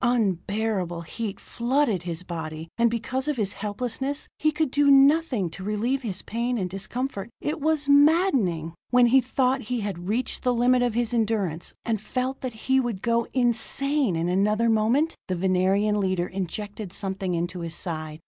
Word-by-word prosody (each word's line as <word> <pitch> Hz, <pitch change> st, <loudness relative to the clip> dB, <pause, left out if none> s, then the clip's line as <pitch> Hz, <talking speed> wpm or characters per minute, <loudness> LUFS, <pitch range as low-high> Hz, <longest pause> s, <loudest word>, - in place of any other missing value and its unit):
Unbearable 205 Hz, -5 st, 0 dB
heat 200 Hz, +4 st, -5 dB
flooded 240 Hz, -, 0 dB
his 170 Hz, -1 st, -4 dB
body. 160 Hz, -2 st, -6 dB
And 235 Hz, +1 st, +3 dB
because 255 Hz, +4 st, -2 dB
of 300 Hz, -3 st, 0 dB
his 205 Hz, -3 st, -1 dB
helplessness, 250 Hz, +7 st, -3 dB
he 310 Hz, -, +3 dB
could 305 Hz, -2 st, -1 dB
do 285 Hz, 0 st, +3 dB
nothing 275 Hz, -, +5 dB
to 185 Hz, +3 st, -8 dB
relieve 220 Hz, +7 st, -1 dB
his 200 Hz, -7 st, -4 dB
pain 235 Hz, +2 st, -2 dB
and 190 Hz, -4 st, -1 dB
discomfort. 200 Hz, +3 st, -4 dB
It 300 Hz, 0 st, -3 dB
was 310 Hz, -1 st, +1 dB
maddening! 285 Hz, -, +3 dB, 0.2 s
When 250 Hz, 0 st, +5 dB
he 260 Hz, +3 st, +5 dB
thought 260 Hz, +1 st, +1 dB
he 240 Hz, +1 st, -3 dB
had 185 Hz, -4 st, -5 dB
reached 240 Hz, +5 st, -1 dB
the 250 Hz, -1 st, +1 dB
limit 245 Hz, +1 st, +3 dB
of 245 Hz, -2 st, 0 dB
his 240 Hz, 0 st, 0 dB
endurance, 210 Hz, -8 st, -1 dB
and 220 Hz, -3 st, -1 dB
felt 255 Hz, +4 st, -3 dB
that 255 Hz, -3 st, -4 dB
he 265 Hz, +4 st, +1 dB
would 235 Hz, -7 st, -2 dB
go 235 Hz, 0 st, +1 dB
insane 255 Hz, -, +1 dB
in 165 Hz, +1 st, -1 dB
another 210 Hz, +5 st, +2 dB
moment, 235 Hz, +9 st, +2 dB
the 185 Hz, -, -1 dB
Venerian 190 Hz, +3 st, +2 dB
leader 185 Hz, -3 st, 0 dB
injected 195 Hz, +2 st, -5 dB
something 190 Hz, -2 st, -3 dB
into 175 Hz, +1 st, -3 dB
his 170 Hz, -1 st, -4 dB
side. 155 Hz, -3 st, -4 dB
225 Hz, 170 wpm, -25 LUFS, 185-255 Hz, 0.2 s, nothing